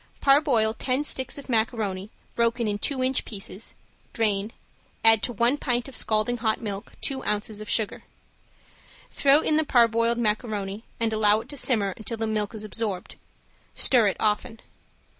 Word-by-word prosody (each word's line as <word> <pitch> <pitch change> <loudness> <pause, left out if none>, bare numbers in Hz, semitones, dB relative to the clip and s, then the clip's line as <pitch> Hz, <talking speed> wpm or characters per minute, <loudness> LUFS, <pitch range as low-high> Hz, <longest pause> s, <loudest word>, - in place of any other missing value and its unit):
Parboil 275 -6 +3
ten 255 +5 -1
sticks 260 -3 -1
of 280 - -10
macaroni 220 -5 -1 0.2
broken 235 0 0
in 205 -1 -2
two 260 +3 -1
inch 260 0 +1
pieces, 200 0 -6 0.4
drain, 210 -1 0 0.5
add 225 -1 +7
to 245 - -2
one 235 +5 +2
pint 245 -2 -1
of 270 - -9
scalding 215 +3 +1
hot 220 -2 0
milk 205 -3 -6
two 265 -1 -2
ounces 210 +1 -2
of 215 - -8
sugar. 220 -3 0 1.1
Throw 280 +2 +4
in 310 - +1
the 315 - +2
parboiled 230 -3 +3
macaroni 210 -2 -2
and 225 -1 +1
allow 215 0 +3
it - - -16
to 290 - -6
simmer 210 -7 +1
until 225 +1 -5
the 225 - -2
milk 215 0 -2
is 215 - -5
absorbed; 210 -3 -4 0.6
stir 240 -5 +5
it 195 - -1
often. 220 +2 -1
225 Hz, 160 wpm, -25 LUFS, 210-245 Hz, 1.1 s, add